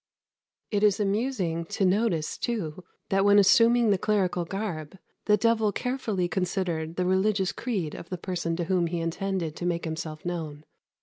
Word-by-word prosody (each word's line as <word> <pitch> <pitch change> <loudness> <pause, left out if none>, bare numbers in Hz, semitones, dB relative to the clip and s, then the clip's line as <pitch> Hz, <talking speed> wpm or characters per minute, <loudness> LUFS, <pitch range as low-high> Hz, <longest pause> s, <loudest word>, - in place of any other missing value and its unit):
] - - -61
It 205 -2 +1
is 210 -1 +4
amusing 200 -5 0
to 195 - -1
notice, 185 -4 +1
too, 185 -8 -3 0.3
that 195 0 +2
when 205 0 +6
assuming 230 +3 +5
the 195 - +2
clerical 185 -5 +1
garb, 185 -4 -5 0.3
the 210 0 +4
devil 220 0 +2
carefully 220 -6 -2
considered 175 -3 -2
the 180 - 0
religious 190 +1 +2
creed 195 -11 -3
of 170 - -9
the 180 - -3
person 170 -2 -3
to 175 - -2
whom 175 0 +1
he 170 +1 -2
intended 165 -1 -2
to 175 - -4
make 170 -1 -1
himself 160 -1 -5
known. 160 -4 -4
185 Hz, 170 wpm, -27 LUFS, 170-210 Hz, 0.3 s, when